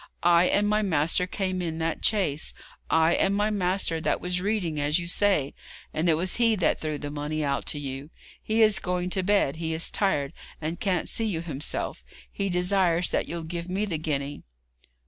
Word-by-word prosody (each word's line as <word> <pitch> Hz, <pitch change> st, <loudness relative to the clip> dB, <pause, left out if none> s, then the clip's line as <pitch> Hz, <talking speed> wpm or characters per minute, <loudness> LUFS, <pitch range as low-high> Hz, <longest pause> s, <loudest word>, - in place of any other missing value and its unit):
I 170 Hz, 0 st, +6 dB
and 205 Hz, +3 st, +2 dB
my 210 Hz, +1 st, +2 dB
master 180 Hz, -1 st, +1 dB
came 185 Hz, -1 st, -2 dB
in 165 Hz, -2 st, -3 dB
that 165 Hz, -1 st, -2 dB
chaise. 170 Hz, -9 st, +1 dB, 0.3 s
I 160 Hz, +1 st, +4 dB
and 195 Hz, -, +2 dB
my 210 Hz, +1 st, +1 dB
master 180 Hz, -4 st, 0 dB
that -, -, 0 dB
was 180 Hz, 0 st, -2 dB
reading, 185 Hz, -7 st, -1 dB
as 145 Hz, +1 st, +2 dB
you 175 Hz, -, -2 dB
say, 170 Hz, -6 st, +1 dB, 0.4 s
and 160 Hz, +3 st, +1 dB
it 160 Hz, -, +4 dB
was 175 Hz, +3 st, -1 dB
he 230 Hz, -2 st, +4 dB
that 185 Hz, -5 st, +1 dB
threw 155 Hz, -1 st, -2 dB
the 145 Hz, 0 st, -6 dB
money 150 Hz, +1 st, -3 dB
out 140 Hz, -1 st, -1 dB
to 145 Hz, -, 0 dB
you. 135 Hz, +1 st, -5 dB, 0.3 s
He 220 Hz, +1 st, +2 dB
is 215 Hz, -3 st, +4 dB
going 180 Hz, 0 st, -2 dB
to 190 Hz, -, +1 dB
bed; 185 Hz, -7 st, +2 dB
he 160 Hz, -1 st, -2 dB
is 160 Hz, -, +1 dB
tired, 145 Hz, -9 st, 0 dB, 0.3 s
and 160 Hz, +2 st, -4 dB
can't 185 Hz, -4 st, 0 dB
see 225 Hz, -, -1 dB
you 180 Hz, -7 st, -1 dB
himself. 150 Hz, -3 st, -4 dB, 0.3 s
He 200 Hz, -1 st, -2 dB
desires 180 Hz, -1 st, +2 dB
that -, -, 0 dB
you'll 170 Hz, 0 st, -4 dB
give 170 Hz, +2 st, -5 dB
me 195 Hz, +3 st, 0 dB
the 170 Hz, -7 st, -3 dB
guinea.' 145 Hz, -2 st, -3 dB
175 Hz, 200 wpm, -26 LUFS, 155-195 Hz, 0.4 s, I